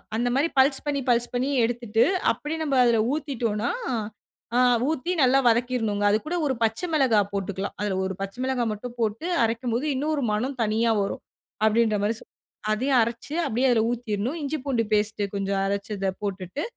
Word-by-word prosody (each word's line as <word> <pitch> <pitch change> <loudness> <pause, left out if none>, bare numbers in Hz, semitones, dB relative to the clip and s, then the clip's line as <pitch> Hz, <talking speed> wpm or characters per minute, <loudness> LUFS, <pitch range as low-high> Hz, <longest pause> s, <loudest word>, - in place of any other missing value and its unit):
அந்த 240 +2 0
மாரி 285 +4 +3
பல்ஸ் 270 +2 +3
பண்ணி 285 -1 0
பல்ஸ் 240 0 +2
பண்ணி 245 +2 0 0.2
எடுத்துட்டு 235 -1 +1 0.3
அப்டியே 310 +2 -4
நம்ப 285 -3 0
அதுல 235 -1 +4 0.2
ஊத்திட்டோம்னா, 240 -7 -2 0.9
அ - - +5 0.3
ஊத்தி 320 +3 -1
நல்லா 265 +1 +5
வதக்கிர்ணுங்க 230 -3 +1
அது 210 - +4
கூட 340 +3 -2
1 270 - +1
பச்ச 225 0 +1
மெளகா 260 -8 +4
போட்டுக்லாம். 195 0 -3
அதுல 205 -2 -1
1 190 - -2
பச்ச 195 +2 -4
மிளகா 260 -2 0
மட்டும் 240 +3 -7
போட்டு, 220 +7 -1 0.2
அரைக்கும்போது 235 +3 -1
இன்னும் 300 +4 -1
ஒரு 280 - -2
மனம் 250 +6 -1
தனியா 225 +2 +1
வரும். 195 - -3 0.4
அப்டின்ற 220 -1 +3
மாரி 215 +2 +1
சொ. - - -14 0.5
அதையும் 255 +4 +2
அரச்சு 235 +6 -3
அப்டியே 250 +4 +1
அதில 225 -2 +3
ஊத்திர்ணும், 240 +4 -2
இஞ்சி 290 +2 -2
பூண்டு 245 -5 +1
பேஸ்ட்டு 210 0 +1
கொஞ்சம் 195 0 -1
அரச்சு 200 +1 -3
இத 195 -1 0
போட்டுட்டு, 195 - -4
235 Hz, 170 wpm, -25 LUFS, 210-265 Hz, 0.9 s, அ